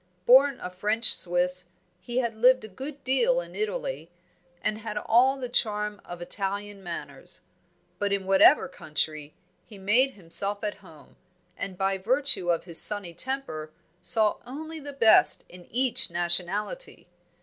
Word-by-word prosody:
Born 270 Hz, +2 st, +5 dB
a 180 Hz, -, -6 dB
French 210 Hz, +5 st, +2 dB
Swiss, 180 Hz, +1 st, +1 dB, 0.3 s
he 240 Hz, 0 st, -6 dB
had 235 Hz, -3 st, 0 dB
lived 255 Hz, +3 st, +4 dB
a -, -, -8 dB
good 270 Hz, +8 st, -9 dB
deal 470 Hz, -, +2 dB
in -, -, -9 dB
Italy, -, -, -4 dB, 0.5 s
and 215 Hz, -, -1 dB
had 215 Hz, -1 st, -6 dB
all 255 Hz, +5 st, +3 dB
the 255 Hz, -2 st, -5 dB
charm 210 Hz, -3 st, -1 dB
of 175 Hz, 0 st, -9 dB
Italian 200 Hz, +2 st, -3 dB
manners; 175 Hz, -2 st, -4 dB, 0.6 s
but 205 Hz, 0 st, -1 dB
in 200 Hz, -1 st, -1 dB
whatever 195 Hz, +9 st, +5 dB
country, 155 Hz, -, -5 dB, 0.3 s
he 215 Hz, -, -14 dB
made 235 Hz, +8 st, +1 dB
himself 200 Hz, +3 st, +1 dB
at 210 Hz, -1 st, -3 dB
home, 160 Hz, -6 st, -18 dB, 0.4 s
and 190 Hz, -2 st, -6 dB
by 195 Hz, 0 st, -1 dB
virtue 240 Hz, -4 st, 0 dB
of 170 Hz, -1 st, 0 dB
his 170 Hz, -2 st, +6 dB
sunny 205 Hz, -5 st, +3 dB
temper 255 Hz, -, -2 dB, 0.3 s
saw 215 Hz, -2 st, +2 dB
only 315 Hz, +6 st, -7 dB
the 285 Hz, -1 st, -7 dB
best 230 Hz, -6 st, +4 dB
in 180 Hz, -1 st, -15 dB
each 250 Hz, -2 st, +1 dB
nationality. 175 Hz, -, -2 dB
210 Hz, 150 wpm, -26 LUFS, 180-260 Hz, 0.6 s, his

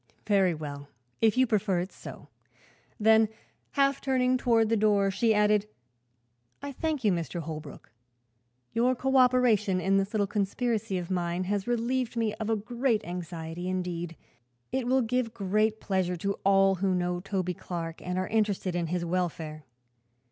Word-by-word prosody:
"Very 195 Hz, -5 st, +3 dB
well, 145 Hz, -2 st, -7 dB, 0.3 s
if 225 Hz, +1 st, +3 dB
you 260 Hz, -, +5 dB
prefer 210 Hz, -5 st, +1 dB
it 180 Hz, +2 st, -4 dB
so." -, -, -11 dB, 0.7 s
Then, 220 Hz, 0 st, +5 dB, 0.4 s
half 275 Hz, -1 st, +2 dB
turning 255 Hz, -1 st, +2 dB
toward 230 Hz, -3 st, +2 dB
the 225 Hz, -, +3 dB
door, 205 Hz, -2 st, +3 dB
she 220 Hz, +4 st, +2 dB
added: 210 Hz, -1 st, +3 dB, 0.9 s
"I 285 Hz, 0 st, -6 dB
thank 300 Hz, 0 st, -2 dB
you, 210 Hz, -, +4 dB
Mr. 170 Hz, 0 st, -2 dB
Holbrook. 155 Hz, -2 st, -8 dB, 0.8 s
Your 245 Hz, +3 st, +2 dB
coöperation 250 Hz, -7 st, +3 dB
in 195 Hz, +2 st, +2 dB
this 195 Hz, +1 st, 0 dB
little 210 Hz, -2 st, +1 dB
conspiracy 210 Hz, +1 st, -1 dB
of 180 Hz, 0 st, -5 dB
mine 175 Hz, 0 st, -1 dB
has 200 Hz, +2 st, -2 dB
relieved 240 Hz, +1 st, -1 dB
me 225 Hz, -2 st, 0 dB
of 220 Hz, 0 st, -3 dB
a 225 Hz, -, +3 dB
great 235 Hz, +2 st, -1 dB
anxiety; 175 Hz, 0 st, -5 dB
indeed, 175 Hz, -2 st, -3 dB, 0.6 s
it 260 Hz, -2 st, -1 dB
will 260 Hz, +1 st, +3 dB
give 230 Hz, 0 st, -1 dB, 0.4 s
pleasure 185 Hz, -3 st, -1 dB
to 200 Hz, +4 st, -1 dB
all 195 Hz, 0 st, +5 dB
who 190 Hz, -2 st, +2 dB
know 175 Hz, 0 st, -1 dB
Toby 185 Hz, -1 st, -2 dB
Clark 165 Hz, -1 st, -6 dB
and 180 Hz, 0 st, -3 dB
are 185 Hz, 0 st, -1 dB
interested 205 Hz, -4 st, 0 dB
in 170 Hz, -1 st, -1 dB
his 175 Hz, +1 st, -2 dB
welfare. 165 Hz, -4 st, -3 dB
200 Hz, 155 wpm, -28 LUFS, 180-230 Hz, 0.9 s, you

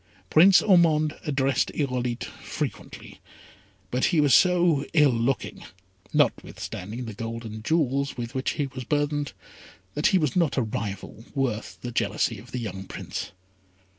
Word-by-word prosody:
Prince 180 Hz, +4 st, +7 dB
Ormond 160 Hz, -5 st, +4 dB
addressed 135 Hz, -2 st, +1 dB
Irolite 125 Hz, -4 st, -1 dB
frequently; -, -, -6 dB, 0.7 s
but 125 Hz, +1 st, +1 dB
he 170 Hz, -, +2 dB
was 145 Hz, -4 st, +4 dB
so 175 Hz, -5 st, +4 dB
ill 150 Hz, -4 st, +5 dB
looking, 120 Hz, +3 st, -1 dB, 0.5 s
notwithstanding 110 Hz, +7 st, -1 dB
the 110 Hz, -, -6 dB
gold 115 Hz, +2 st, -5 dB
and 110 Hz, 0 st, -7 dB
jewels 140 Hz, -2 st, 0 dB
with 120 Hz, +1 st, -5 dB
which 130 Hz, -1 st, -1 dB
he 145 Hz, -, -1 dB
was 130 Hz, -1 st, -7 dB
burthened, 145 Hz, +1 st, -1 dB, 0.6 s
that 150 Hz, -, +2 dB
he 190 Hz, -, +4 dB
was 155 Hz, -7 st, 0 dB
not 170 Hz, -6 st, +2 dB
a 130 Hz, -, +3 dB
rival 105 Hz, 0 st, -5 dB
worth 125 Hz, -5 st, -2 dB
the 120 Hz, -, -5 dB
jealousy 115 Hz, -1 st, 0 dB
of 120 Hz, +4 st, -14 dB
the -, -, -3 dB
young 95 Hz, -5 st, -5 dB
Prince. -, -, -6 dB
135 Hz, 145 wpm, -26 LUFS, 115-150 Hz, 0.7 s, Prince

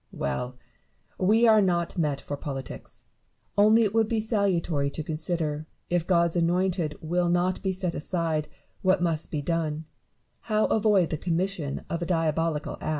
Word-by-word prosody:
"Well! 125 Hz, -, -3 dB, 0.6 s
we 220 Hz, +5 st, +4 dB
are 220 Hz, -1 st, +6 dB
not 175 Hz, -3 st, 0 dB
met 150 Hz, -5 st, 0 dB
for 145 Hz, -, -4 dB
politics: 135 Hz, -3 st, -7 dB, 0.5 s
only 215 Hz, +3 st, +6 dB
it 210 Hz, -2 st, 0 dB
would 225 Hz, -1 st, +3 dB
be 225 Hz, 0 st, 0 dB
salutary 185 Hz, -9 st, 0 dB
to 155 Hz, +2 st, -4 dB
consider, 155 Hz, -1 st, -3 dB, 0.2 s
if 175 Hz, -1 st, +1 dB
God's 170 Hz, -2 st, +3 dB
anointed 175 Hz, -2 st, +1 dB
will 175 Hz, +2 st, 0 dB
not 175 Hz, +1 st, +1 dB
be 190 Hz, -, 0 dB
set 185 Hz, -2 st, -2 dB
aside, 160 Hz, -1 st, -1 dB, 0.3 s
what 185 Hz, -1 st, +3 dB
must 165 Hz, -2 st, -1 dB
be 150 Hz, -2 st, -3 dB
done 160 Hz, -1 st, -1 dB, 0.3 s
— -, -, -45 dB
how 215 Hz, 0 st, +3 dB
avoid 205 Hz, -5 st, +3 dB
the 155 Hz, -, -1 dB
commission 175 Hz, -4 st, -2 dB
of 170 Hz, -, -3 dB
a 170 Hz, -, -2 dB
diabolical 165 Hz, -2 st, 0 dB
act. -, -, -3 dB
170 Hz, 160 wpm, -27 LUFS, 155-190 Hz, 0.6 s, are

